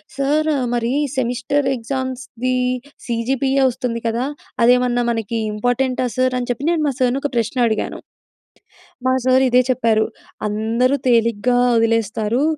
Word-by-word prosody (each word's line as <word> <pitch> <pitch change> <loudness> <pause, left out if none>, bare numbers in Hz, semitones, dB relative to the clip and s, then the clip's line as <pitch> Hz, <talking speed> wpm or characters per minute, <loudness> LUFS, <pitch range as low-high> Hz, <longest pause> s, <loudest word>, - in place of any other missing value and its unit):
Sir 295 +3 +1 0.2
మరి 235 -1 0 0.3
semester 260 +3 0
exams 260 +1 -4 0.2
the 255 - +2 0.5
CGPA 265 +3 0
వస్తుంది 235 -1 -3
కదా! 230 +3 -1 0.4
అదేమన్నా 245 0 +4
మనకి 225 -1 -2 0.2
ఇంపార్టెంటా 250 +4 0
సార్ 255 0 +1
అని 245 - -3
చెప్పి 245 +4 -2
నేను 340 -2 +1
మా - - +1
సార్‌ని 255 +1 +1
ఒక 290 - -1
ప్రశ్న 235 +2 -1
అడిగాను. 220 -1 -2 1.1
మా 255 - +3
సార్ 260 +1 +4
ఇదే 250 +1 +5
చెప్పారు 230 -4 +2 0.4
"అందరూ 225 +5 +1
తేలిగ్గా 235 0 +2 0.2
వదిలేస్తారు, 225 +1 +1
245 Hz, 130 wpm, -19 LUFS, 230-260 Hz, 1.1 s, ఇదే